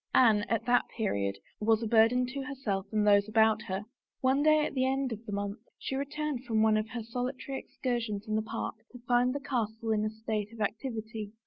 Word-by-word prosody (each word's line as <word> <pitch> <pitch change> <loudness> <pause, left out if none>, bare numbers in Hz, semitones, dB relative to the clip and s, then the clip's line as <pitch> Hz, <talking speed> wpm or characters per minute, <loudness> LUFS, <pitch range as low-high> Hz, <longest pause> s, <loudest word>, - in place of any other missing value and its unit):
Anne, 225 -5 +6
at 230 -2 0
that 245 0 +3
period, 100 - 0 0.2
was 225 +1 +2
a - - -1
burden 230 +3 +5
to 265 +2 -5
herself 245 -9 -3
and 215 -1 +2
those 200 0 +5
about 220 0 +4
her. 190 +2 -2 0.4
One 265 +2 +3
day 310 0 +5
at - - -4
the 260 -2 +1
end 265 -1 0
of 220 0 -5
the - - -4
month 200 +1 -3 0.2
she 265 - -4
returned 285 -1 -2
from 220 -3 +2
one 220 -1 +4
of 215 +1 0
her 235 -1 -4
solitary 250 +4 -4
excursions 230 -4 -3
in 215 - -2
the 215 - +2
park 220 0 -4 0.2
to 245 - -9
find 245 +1 +4
the 285 - -2
castle 230 -5 -2
in 215 -1 +2
a 215 - 0
state 220 -1 -3
of 230 - -12
activity. 220 -1 -3
225 Hz, 215 wpm, -30 LUFS, 215-255 Hz, 0.4 s, Anne